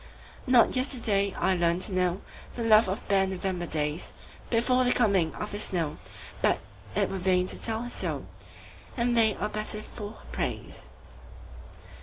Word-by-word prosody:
Not 250 -1 +5
yesterday 230 -7 0
I 190 - +2
learned 175 +1 +1
to - - 0
knowThe 185 +5 -3
love 215 -1 +6
of 190 +2 -4
bare 195 -1 +3
November 185 -2 -3
daysBefore 225 - -1
the 250 - +3
coming 195 -9 +2
of 210 - -5
the 205 - -4
snow, 170 -7 -1 0.4
But - - +3 0.4
it - - +2
were 195 - -3
vain 180 0 +2
to - - -2
tell 225 0 0
her 245 - -5
so, - - -3 0.7
And 240 0 +1
they 220 -2 +4
are 210 - -2
better 215 0 -3
for 210 -1 -8
her - - -17
praise. 65 - -5
205 Hz, 155 wpm, -28 LUFS, 185-230 Hz, 0.7 s, love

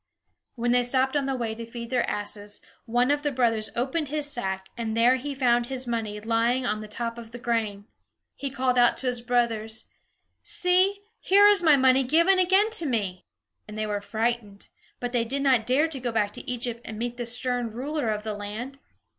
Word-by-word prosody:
When 240 0 0
they 245 0 +4
stopped 260 +2 +1
on 280 -2 +1
the 270 - -1
way 230 -3 -2
to 230 +1 -7
feed 235 +1 -8
their 250 -2 +1
asses, 205 0 -4 0.3
one 245 +3 +2
of 290 0 +1
the 290 -1 -1
brothers 230 -4 +1
opened 270 +6 -1
his 295 +1 -2
sack, 190 -8 -3
and 225 -2 -3
there 245 +3 +5
he 280 +2 -5
found 240 -2 +2
his 260 0 -3
money 225 -3 -3
lying 230 +3 +1
on 215 -2 0
the 215 - -7
top 230 +2 -4
of 230 -1 -10
the 240 - -7
grain. 225 -4 -2 0.5
He 280 - -4
called 255 -2 +1
out 240 0 +4
to - - -4
his 250 -1 -1
brothers: 230 -3 0 0.6
"See, 370 +3 +2 0.2
here 400 +2 +5
is 410 -2 +5
my 310 -4 +6
money 260 0 +4
given 335 +8 +4
again 380 +4 +4
to 340 -8 -1
me!" 200 -8 -2 0.4
And 210 0 -8
they 215 - -1
were 205 -1 -2
frightened, 220 -1 -2 0.3
but 245 -1 -3
they 240 -2 +1
did 275 +4 -2
not 255 -5 +3
dare 275 +5 +3
to 285 -4 -4
go 245 -1 -2
back 210 -2 0
to 280 - -6
Egypt 240 -1 -3
and 215 - -7
meet 240 +1 -3
the 240 -1 -4
stern 245 0 0
ruler 265 +3 -3
of 210 -1 -2
the 215 -1 -3
land. 215 +7 -6
240 Hz, 210 wpm, -26 LUFS, 225-270 Hz, 0.6 s, my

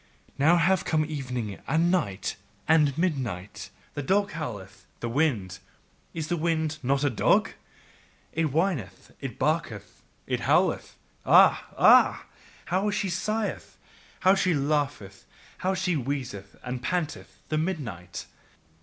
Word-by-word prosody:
Now 160 +5 +5
have 185 +2 +3
come 155 -1 +1
evening 125 -9 -4
and 165 +2 +2
night 105 - -1 0.3
and 150 -3 +4
midnight, 130 - -2 0.2
the 145 - -3
dog 200 +8 +1
howleth, 100 - -7
the 120 - -3
wind: 115 - 0 0.6
Is 160 -2 -3
the 175 - 0
wind 160 -1 -1
not 135 +2 +1
a 145 - +3
dog? 115 - +3 0.8
It 165 0 +1
whineth, 160 - -2
it - - -6
barketh, - - -2 0.2
it - - -1
howleth. - - +1 0.3
Ah! - - +5
Ah! - - +6 0.4
how 190 +4 0
she 205 -1 -1
sigheth! 215 +4 -3 0.4
how 190 +1 +6
she 185 -3 +2
laugheth, 140 -9 -2 0.3
how 190 +1 0
she 180 -1 0
wheezeth 125 -8 -4
and 125 0 -4
panteth, 160 +4 -3
the 155 - +1
midnight! 125 - -4
150 Hz, 130 wpm, -27 LUFS, 120-175 Hz, 0.8 s, Ah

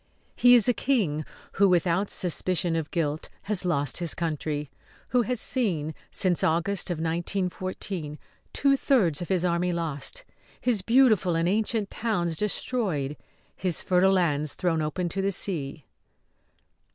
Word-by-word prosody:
He 245 0 +7
is 230 -4 +4
a 245 - +4
King 200 - 0 0.3
who, 200 0 +3
without 180 +2 +2
suspicion 180 -1 0
of 160 -2 -2
guilt, 155 -2 -2
has 200 -3 0
lost 145 -5 0
his 170 -2 0
country; 150 -3 -3 0.4
who 250 - +3
has 245 +1 -1
seen 175 - 0 0.2
since 180 -3 0
August 170 +5 +1
of 175 - -2
1914 175 -1 -3 0.3
two 275 -1 +3
thirds 205 - +2
of 175 - -5
his 180 -2 +1
army 175 +1 +1
lost, 170 - -3 0.3
his 235 -6 +1
beautiful 215 -6 +4
and 165 +1 +1
ancient 215 +1 0
towns 175 -8 -1
destroyed, 190 - -2 0.4
his 180 -3 -1
fertile 190 +1 +3
lands 155 -5 +1
thrown 165 -3 0
open 155 +4 -2
to 195 - -2
the 195 +1 0
sea. 155 -7 -2
180 Hz, 140 wpm, -26 LUFS, 160-205 Hz, 0.4 s, He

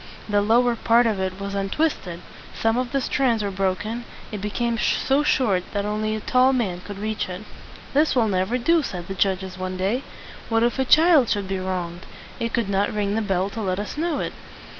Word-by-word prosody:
The 205 -1 +2
lower 235 +3 +3
part 230 +1 +4
of 215 -4 +1
it 190 0 -3
was 200 0 -4
un 195 0 -1
twist 310 - 0
ed; 170 0 -7 0.4
some 225 0 +2
of 250 0 -1
the 275 - +1
strands 245 -4 +1
were 200 - -2
broken; 195 +5 -2 0.3
it 210 -3 -5
became 230 +3 -1
so 270 +2 +2
short 225 -11 +2
that 200 -1 -1
only 215 +1 -1
a - - -3
tall 255 +4 +3
man 195 -9 -1
could 205 -1 -8
reach 215 -1 -2
it. 180 +3 -6 0.5
"This 300 +2 +3
will 235 -3 +3
never 190 +4 0
do," 330 +7 +3
said 180 - -5
the 195 - -4
judges 190 -1 -1
one 185 0 -3
day. 200 +8 0 0.5
"What 225 0 +2
if 240 +3 +1
a 265 - +2
child 310 -3 +6
should 200 -2 0
be 190 0 -2
wronged? 180 -1 -4 0.3
It 230 0 -2
could 235 -4 0
not 200 +1 +1
ring 205 -1 -1
the 225 - +1
bell 195 -1 0
to 225 - -5
let 185 -3 -1
us 205 - -5
know 320 0 -1
it." - - -3
210 Hz, 220 wpm, -23 LUFS, 190-240 Hz, 0.5 s, child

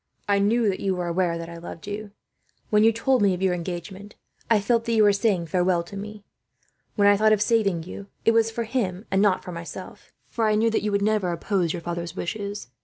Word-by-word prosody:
"I 200 -1 +3
knew 220 +3 +2
that 195 - 0
you 190 -1 0
were 180 -1 -3
aware 170 0 0
that 165 0 -6
I 170 0 -9
loved 170 -1 -9
you. 205 +1 -5 0.6
When 210 0 +5
you 225 - +6
told 240 +2 +1
me 195 -2 +3
of 180 - -8
your 185 -1 +3
engagement, 180 +4 -6 0.3
I 225 -2 +5
felt 230 +3 +1
that 235 - 0
you 220 -1 +5
were 205 -1 +5
saying 200 -4 +1
farewell 175 +1 +1
to 185 +4 -11
me. 210 +1 -8 0.7
When 205 -2 +4
I 205 - +6
thought 215 +1 +4
of 215 - +2
saving 210 -6 +1
you, 195 +3 -9 0.2
it 225 - +6
was 225 0 +3
for 230 +1 -3
him 215 -4 -2
and 190 +1 +3
not 205 -3 +2
for 180 - -7
myself; 170 -1 -9 0.2
for 225 -2 -1
I 215 - +3
knew 225 +2 +2
that - - +1
you 210 - -1
would 200 0 +1
never 210 -4 +1
oppose 175 0 -1
your 170 -1 -5
father's 170 0 -4
wishes. 200 - -5
200 Hz, 240 wpm, -24 LUFS, 180-215 Hz, 0.7 s, you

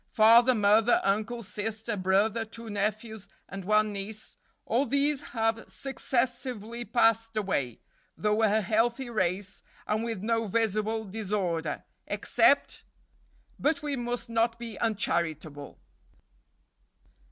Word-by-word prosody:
Father, 235 +3 +6
mother, 215 +2 +4
uncle, 215 +4 -1
sister, 220 +2 -3
brother, 200 +4 +1
two 225 0 -9
nephews, 215 +1 -3 0.2
and 195 -2 -7
one 215 +1 +3
niece, 205 +2 -6 0.3
all 255 +5 +1
these 280 0 +1 0.2
have 225 0 +1
successively 240 -3 -3
passed 225 -2 +2
away, 140 - -1 0.4
though 210 +1 +1
a 220 0 +3
healthy 235 +5 0
race, 190 -2 -1 0.2
and 215 +1 0
with 225 -4 -4
no 225 0 0
visible 220 +1 0
disorder 190 -6 -2 0.2
except - - +2 0.8
But 300 +1 +1
we 290 -2 -1
must 245 -1 -3
not 230 0 +1
be 235 -2 -7
uncharitable." 160 -9 -2
220 Hz, 110 wpm, -28 LUFS, 205-235 Hz, 0.8 s, Father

